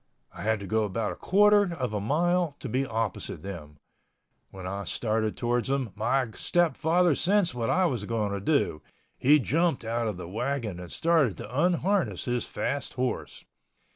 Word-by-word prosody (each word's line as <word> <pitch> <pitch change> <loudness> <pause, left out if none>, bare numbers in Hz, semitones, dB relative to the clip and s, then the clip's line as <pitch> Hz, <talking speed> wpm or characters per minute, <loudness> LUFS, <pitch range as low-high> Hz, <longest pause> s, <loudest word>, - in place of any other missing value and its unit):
I - - -9
had 110 0 +1
to - - -6
go 110 +3 +1
about 105 +2 -2
a - - -6
quarter 205 -2 +4
of 125 -7 -3
a 105 - -1
mile 170 - +1
to - - -5
be 130 +3 0
opposite 110 -7 -3
them. 80 -7 -8 0.7
When 95 -1 -9
I 100 +2 -4
started 110 0 -1
towards 120 0 0
them, 135 -5 -1
my 120 +6 +1
stepfather 175 +3 +2
sensed 190 +1 +2
what 115 -2 -2
I 185 +1 +3
was 125 - -1
going 110 -2 -1
to 100 - -2
do. 100 - +1 0.4
He 145 +4 +6
jumped 150 0 +1
out 115 +1 -1
of 105 -4 -3
the 90 - -7
wagon 110 -1 -3
and 90 -1 -9
started 160 - +2
to 115 +5 -8
unharness 185 +2 +1
his 125 -2 -1
fast 140 0 -3
horse. 130 0 -3
125 Hz, 175 wpm, -27 LUFS, 105-165 Hz, 0.7 s, He